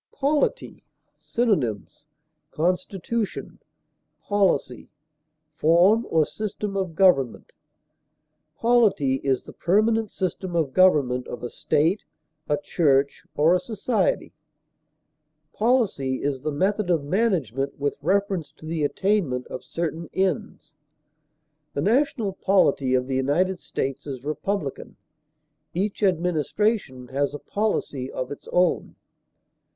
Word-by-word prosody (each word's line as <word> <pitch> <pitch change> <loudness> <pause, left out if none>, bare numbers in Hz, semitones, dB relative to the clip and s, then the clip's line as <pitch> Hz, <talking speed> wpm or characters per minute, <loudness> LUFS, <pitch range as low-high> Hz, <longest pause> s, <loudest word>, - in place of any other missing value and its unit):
POLITY. 290 - 0 0.3
Synonyms: 150 - -1 0.4
constitution, 185 +5 -2 0.6
policy, 190 - 0 0.6
form 175 +9 +4
or 160 -2 +3
system 210 +1 -4
of 185 -4 -2
government. 160 -10 +3 1.0
Polity 215 - +3
is 135 -2 +1
the - - -12
permanent 215 +4 +2
system 185 -1 -3
of 155 -6 0
government 140 -9 +3
of 120 - -7
a 120 - -4
state, 165 +8 +1 0.5
a 150 - +2
church, 140 -7 +1
or 155 +4 +4
a 180 - +3
society; 215 -2 -1 1.2
policy 210 - +1
is 140 -2 -1
the 155 +2 -2
method 195 +6 0
of 165 -5 +2
management 145 - 0
with 145 0 -1
reference 190 -2 0
to 155 - -14
the 160 -1 -2
attainment 150 -6 0
of 130 - -6
certain 165 0 -4
ends; 185 -4 -2 1.0
the 140 - 0
national 230 - +1
polity 145 -10 +2
of 125 0 +1
the 130 0 -1
United 175 +8 +1
States 135 -1 -4
is 135 -2 -6
republican; 155 0 -3 0.8
each 195 +4 -2
administration 180 - 0
has 140 +2 -1
a - - -3
policy 145 -9 -2
of 130 +1 -4
its 145 - -9
own. 180 -1 +1
170 Hz, 110 wpm, -24 LUFS, 140-200 Hz, 1.2 s, form